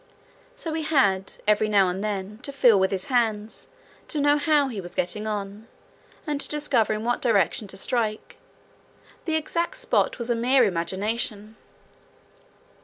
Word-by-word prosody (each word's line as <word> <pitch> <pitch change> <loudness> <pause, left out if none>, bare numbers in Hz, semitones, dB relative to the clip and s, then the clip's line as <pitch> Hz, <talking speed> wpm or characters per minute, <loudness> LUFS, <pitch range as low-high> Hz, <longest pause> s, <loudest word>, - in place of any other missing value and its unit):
So 335 -11 -5
he 320 - -2
had, 230 -12 +1
every 215 0 +3
now 200 -3 +4
and 185 +3 -3
then, 205 0 -4
to 280 - -5
feel 245 -7 +5
with 190 0 +2
his 190 -1 -3
hands 225 -4 -1 0.4
to 305 - -3
know 290 +1 +3
how 290 -1 +3
he 225 -7 -5
was 175 -1 -9
getting 210 +5 -1
on, 205 +1 -5 0.6
and 295 -2 -2
to - - -2
discover 285 -8 +1
in 215 0 -4
what 240 +1 -1
direction 220 -1 +2
to 195 - -6
strike: 220 0 -2 0.9
the 320 - 0
exact 335 +7 -1
spot - - 0
was 235 0 -3
a - - +2
mere 250 +3 +3
imagination. 205 +4 -2
220 Hz, 160 wpm, -25 LUFS, 200-280 Hz, 0.9 s, feel